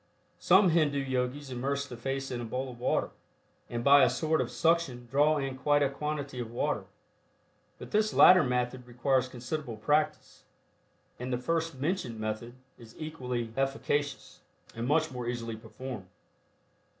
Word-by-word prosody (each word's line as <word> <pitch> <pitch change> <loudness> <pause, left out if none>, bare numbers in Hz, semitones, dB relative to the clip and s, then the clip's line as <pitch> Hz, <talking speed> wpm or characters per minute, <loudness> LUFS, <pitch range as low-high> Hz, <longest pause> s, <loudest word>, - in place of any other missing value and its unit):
Some 190 +1 +5
Hindu 155 -4 +2
yogis 130 +1 -2
immerse 140 +3 -2
the 125 - -8
face 135 +3 -3
in 120 -1 -3
a - - -4
bowl 130 +3 -3
of 120 - -13
water, 125 - 0 0.6
and 120 0 -3
by 140 +1 +7
a - - +5
sort 160 0 +1
of - - -2
suction 165 -8 +1
draw 150 +3 +4
in 135 -2 -2
quite 145 +2 +2
a 140 - +1
quantity 145 -2 -4
of 120 -2 -4
water, 120 - -1 0.9
but - - -10
this 215 0 +2
latter 180 -1 +8
method 125 -1 -1
requires 130 +2 +1
considerable 125 0 -5
practice, 150 +7 0 0.8
and 125 +1 -4
the 125 - +1
first 165 +2 -2
mentioned 140 - -2
method 110 +3 -4 0.2
is 115 -1 -14
equally 125 -7 -4
efficacious, 140 +1 -2 0.3
and 115 +1 -4
much 155 +2 +2
more 125 -2 -5
easily 115 -2 -3
performed. 115 -2 -8
135 Hz, 155 wpm, -30 LUFS, 120-150 Hz, 0.9 s, latter